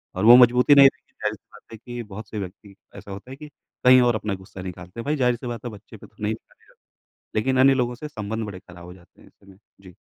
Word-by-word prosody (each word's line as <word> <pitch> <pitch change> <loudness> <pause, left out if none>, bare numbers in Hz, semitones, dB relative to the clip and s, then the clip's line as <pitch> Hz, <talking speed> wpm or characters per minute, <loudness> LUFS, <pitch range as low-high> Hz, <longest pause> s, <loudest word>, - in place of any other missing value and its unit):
और 95 +4 -1
वो 120 +1 +10
मजबूती 125 +3 +5
ना 140 - +9
एक 135 - +7 0.2
ज़ाहिर-सी 105 -1 -5
बात 105 - -18
है 110 - -9
कि 120 -1 -6
बहुत 105 0 -10
से 105 - -5
व्यक्ति 100 +1 -9 0.2
ऐसा 100 - -11
होता 100 +7 -10
है, - - -7
कि 150 - -10 0.4
कहीं 130 0 +8
और 120 -2 +2
अपना 105 -1 -3
गुस्सा 95 0 -11
निकालते 90 +3 -9
हैं। 115 - -6
भाई 150 +1 0
ज़ाहिर-सी 125 -2 0
बात 120 0 -6
है 120 - -4
बच्चे 105 +1 -13
पे - - -14
तो - - -32
नहीं 105 +1 -1
निकालेगा, 110 - -17 0.6
लेकिन 130 +4 0
अन्य 135 +1 +6
लोगों 125 -1 -1
से 150 +5 -8
संबंध 110 -3 -5
बड़े 95 -3 -8
ख़राब 85 0 -14
हो 90 +1 -11
जाते 85 -2 -22
हैं - - -18
ऐसे 100 - -27
में, 95 - -19 0.2
जी। 90 -3 -15
110 Hz, 260 wpm, -23 LUFS, 100-125 Hz, 0.6 s, वो